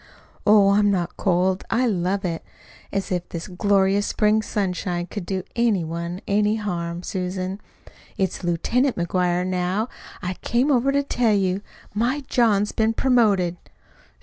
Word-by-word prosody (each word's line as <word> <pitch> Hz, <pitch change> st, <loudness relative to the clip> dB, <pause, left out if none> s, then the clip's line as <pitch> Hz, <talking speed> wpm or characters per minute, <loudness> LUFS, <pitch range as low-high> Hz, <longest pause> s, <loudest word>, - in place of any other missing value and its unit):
"Oh, 205 Hz, -1 st, +6 dB
I'm 205 Hz, +1 st, +4 dB
not 180 Hz, -3 st, -1 dB
cold. 185 Hz, 0 st, +1 dB
I 250 Hz, +3 st, +2 dB
love 195 Hz, -2 st, 0 dB
it. 165 Hz, -2 st, -3 dB, 0.5 s
As 195 Hz, -1 st, -2 dB
if 180 Hz, -1 st, -2 dB
this 170 Hz, -1 st, -5 dB
glorious 195 Hz, +1 st, +2 dB
spring 215 Hz, 0 st, +2 dB
sunshine 180 Hz, -4 st, -2 dB
could 185 Hz, -1 st, -7 dB
do 190 Hz, -2 st, -2 dB
any 230 Hz, -6 st, +2 dB
one 170 Hz, +3 st, -4 dB
any 210 Hz, +1 st, +2 dB
harm! 175 Hz, -5 st, -3 dB
Susan, 185 Hz, 0 st, -3 dB, 0.6 s
it's 190 Hz, -1 st, -1 dB
LIEUTENANT 235 Hz, -, +1 dB
McGuire, 180 Hz, 0 st, 0 dB
now! 185 Hz, +5 st, -1 dB, 0.3 s
I 180 Hz, +1 st, -2 dB
came 250 Hz, +5 st, +1 dB
over 265 Hz, +1 st, +3 dB
to 280 Hz, 0 st, +1 dB
tell 240 Hz, -5 st, +1 dB
you. 190 Hz, -1 st, 0 dB, 0.3 s
My 240 Hz, +7 st, 0 dB
John's 210 Hz, -4 st, +2 dB
been 220 Hz, 0 st, +1 dB
promoted." 210 Hz, -9 st, +2 dB
195 Hz, 145 wpm, -23 LUFS, 180-215 Hz, 0.6 s, Oh